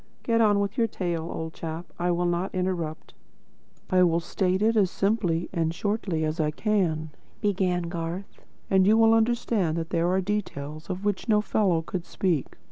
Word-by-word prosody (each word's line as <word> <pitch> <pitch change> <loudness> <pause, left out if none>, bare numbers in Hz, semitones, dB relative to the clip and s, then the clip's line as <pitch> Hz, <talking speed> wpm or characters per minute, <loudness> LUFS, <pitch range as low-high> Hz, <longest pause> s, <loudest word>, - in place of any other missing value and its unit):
Get 230 -1 +2
on 205 -2 +4
with 200 +4 -2
your 230 - +3
tale, 170 -5 -3
old 160 0 -5
chap. 165 +1 -5
I 175 +1 +1
will 175 0 +1
not 175 +2 -1
interrupt." 175 -4 -3 0.8
"I 185 0 +5
will 170 -2 +4
state 185 +3 0
it 225 +1 +3
as 200 -4 +4
simply 190 -5 0
and 165 -3 +1
as 165 - -5
shortly 195 -6 -1
as 155 +2 -3
I 155 -1 +2
can," 160 -4 0 0.3
began 185 -3 +1
Garth. 170 +2 -5 0.3
"And 190 -1 +4
you 215 +2 +5
will 225 0 +6
understand 225 -7 +1
that 165 0 -4
there 170 0 +1
are 185 +1 +2
details 155 -7 -4
of 185 +2 -4
which 205 +3 -1
no 210 -1 +5
fellow 195 -6 +1
could 175 +1 -4
speak. 175 -8 -1
180 Hz, 185 wpm, -26 LUFS, 165-205 Hz, 0.8 s, will